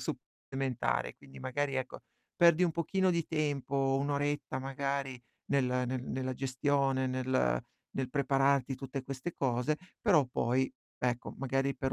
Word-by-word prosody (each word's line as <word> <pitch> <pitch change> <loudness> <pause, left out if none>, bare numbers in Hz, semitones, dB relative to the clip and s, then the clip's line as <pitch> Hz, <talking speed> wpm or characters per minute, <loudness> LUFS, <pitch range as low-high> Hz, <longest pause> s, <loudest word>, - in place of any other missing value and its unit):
supplementare. 130 - -2
Quindi 65 0 -14
magari 140 - -1
ecco, 130 -1 -3 0.3
perdi 170 0 +6
un 170 - +1
pochino 185 +3 +2
di 170 -2 0
tempo, 140 -3 +1
1 140 - -1
oretta 145 -2 -1
magari 135 -1 -2 0.3
nel 140 -2 +4 0.2
ne 130 +1 -1
nella 130 +1 -3
gestione, 135 0 +1
nel 130 - +1 0.3
nel 130 -1 -1
prepararti 140 -1 +2
tutte 135 0 -5
queste 135 +5 -5
cose, 130 +3 +1 0.3
però 165 - +5
poi, 125 +1 +1 0.3
ecco, 125 0 -1
magari 135 +1 0
per 135 -1 -1
135 Hz, 135 wpm, -32 LUFS, 130-145 Hz, 0.3 s, perdi